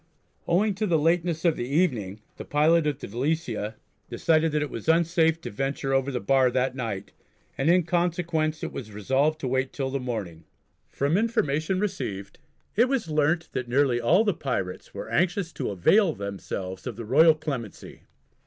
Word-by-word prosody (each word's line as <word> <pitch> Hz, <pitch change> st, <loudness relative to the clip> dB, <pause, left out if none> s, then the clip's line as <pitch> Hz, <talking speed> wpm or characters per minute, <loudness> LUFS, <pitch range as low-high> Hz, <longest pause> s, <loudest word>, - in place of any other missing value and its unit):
Owing 200 Hz, +5 st, +2 dB
to 210 Hz, +3 st, -2 dB
the 170 Hz, -3 st, +3 dB
lateness 165 Hz, +1 st, +1 dB
of 165 Hz, -2 st, +4 dB
the 120 Hz, -, -4 dB
evening 125 Hz, -, 0 dB, 0.2 s
the -, -, -6 dB
pilot 155 Hz, +2 st, +3 dB
of 145 Hz, -3 st, -1 dB
the -, -, -8 dB
Delicia 120 Hz, -3 st, -2 dB, 0.3 s
decided 160 Hz, -1 st, +2 dB
that 150 Hz, 0 st, 0 dB
it 150 Hz, -, -5 dB
was 115 Hz, +7 st, -5 dB
unsafe 165 Hz, 0 st, +3 dB
to -, -, -6 dB
venture 135 Hz, +4 st, -2 dB
over 135 Hz, 0 st, +1 dB
the 125 Hz, -, -2 dB
bar 130 Hz, +4 st, +3 dB
that 130 Hz, +1 st, 0 dB
night, 110 Hz, -7 st, -4 dB, 0.4 s
and 135 Hz, +4 st, 0 dB
in 180 Hz, +1 st, +5 dB
consequence 170 Hz, -2 st, -1 dB
it -, -, -3 dB
was 115 Hz, -5 st, -7 dB
resolved 135 Hz, +9 st, 0 dB
to 130 Hz, -, -2 dB
wait 130 Hz, +1 st, 0 dB
till 135 Hz, -2 st, -3 dB
the 140 Hz, -, -1 dB
morning. 105 Hz, -10 st, -5 dB, 0.5 s
From 145 Hz, +6 st, 0 dB
information 185 Hz, -, 0 dB
received 145 Hz, -, -4 dB, 0.4 s
it 240 Hz, +4 st, +4 dB
was 260 Hz, -11 st, -1 dB
learnt 155 Hz, +2 st, +1 dB
that 125 Hz, -2 st, -4 dB
nearly 125 Hz, -2 st, +2 dB
all 180 Hz, -, +4 dB
the 205 Hz, -3 st, +1 dB
pirates 110 Hz, -, -4 dB
are -, -, -6 dB
anxious 175 Hz, 0 st, 0 dB
to -, -, -3 dB
avail 160 Hz, -, +3 dB
themselves 95 Hz, -1 st, -6 dB
of 120 Hz, -, -4 dB
the 115 Hz, +1 st, -7 dB
royal 155 Hz, +7 st, +6 dB
clemency. 135 Hz, -9 st, -6 dB
145 Hz, 180 wpm, -26 LUFS, 120-165 Hz, 0.5 s, royal